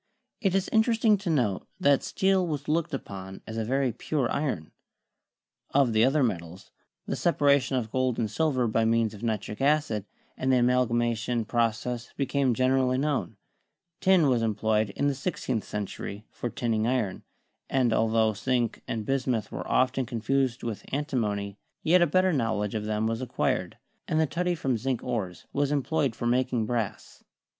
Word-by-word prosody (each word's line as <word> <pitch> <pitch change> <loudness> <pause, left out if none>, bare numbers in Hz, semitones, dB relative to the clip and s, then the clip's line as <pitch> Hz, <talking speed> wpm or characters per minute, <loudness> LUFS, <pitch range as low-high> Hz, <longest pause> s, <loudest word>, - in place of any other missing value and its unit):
It 195 -4 +1
is 195 0 +1
interesting 220 -1 +4
to 195 -3 -4
note 120 - 0
that 140 -1 +4
steel 190 -2 +1
was 150 -3 -4
looked 165 +2 0
upon 95 -7 -7
as 110 - -7
a 115 - -1
very 130 +2 +1
pure 130 +2 -2
iron. 130 - -2 1.0
Of 135 -5 +4
the 110 +1 +4
other 135 +3 +3
metals, 90 -4 -3 0.3
the - - -2
separation 140 -5 +2
of 110 -3 -3
gold 130 -2 0
and 115 - 0
silver 135 0 +1
by 115 +1 +1
means 115 -1 +2
of 105 - -11
nitric 110 -1 -3
acid, 140 -8 +1 0.3
and 130 0 0
the 130 - +5
amalgamation 120 -1 +1
process 120 +1 -1
became 140 -3 +1
gen 130 +2 +2
erally 130 -1 +2
known; 140 - -1 0.6
tin 185 -4 +4
was 125 -3 +2
employed 110 -1 +1
in 140 - 0
the 140 - +2
sixteenth 130 - -3
century 105 0 -5
for 120 - -4
tinning 115 -2 -1
iron; 120 -7 -1 0.5
and 125 -4 +2
altho 110 -1 +2
zinc 120 +1 -1
and 110 -2 -3
bismuth 130 -4 -1
were - - -5
often 130 0 +2
confused 125 +1 0
with 115 -3 -4
antimony, 105 -9 -2 0.2
yet 175 +3 +5
a 175 - +5
better 185 +3 +3
knowledge 110 -6 0
of 105 -1 -2
them 105 0 -1
was 115 +2 -1
acquired, 130 - -1 0.3
and 155 - +1
the 160 - +4
tutty 175 +5 -1
from 130 -5 0
zinc 130 0 -2
ores 105 -8 -3
was 140 0 +1
employed 140 -3 0
for - - -5
making 125 -1 +1
brass. 115 -3 -4
125 Hz, 165 wpm, -27 LUFS, 110-140 Hz, 1.0 s, the